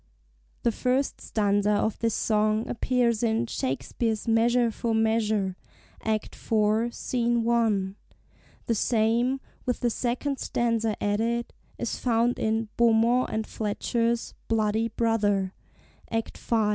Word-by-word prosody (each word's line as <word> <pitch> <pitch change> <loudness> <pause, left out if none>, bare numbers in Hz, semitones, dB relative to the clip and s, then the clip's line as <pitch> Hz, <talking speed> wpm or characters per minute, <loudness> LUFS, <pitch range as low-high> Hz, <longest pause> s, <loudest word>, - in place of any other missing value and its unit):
The 235 - +3
first 255 +4 0
stanza 205 -1 +1
of 215 +1 0
this 230 -1 0
song 215 0 +1
appears 235 -2 +1
in 230 0 +1
Shakespeare's 220 - -2
"Measure 235 +1 +3
for 225 +1 -1
Measure," 220 -4 +1 0.5
Activ. 220 +1 0
Sc. 235 -1 0
I.; 210 -5 +1 0.7
the 230 - +1
same, 235 +4 +2 0.3
with 250 - -1
the 240 - +2
second, 255 +4 -2
stanza 230 -2 0
added, 230 +3 0 0.2
is 240 - -3
found 235 0 +1
in 220 0 0
Beaumont 235 +2 +4
and 220 0 -1
Fletcher's 230 +3 -1
"Bloody 220 0 +1
Brother," 210 -4 +1 0.6
Act 225 0 -2
v. 235 - -2
225 Hz, 115 wpm, -27 LUFS, 215-235 Hz, 0.7 s, Beaumont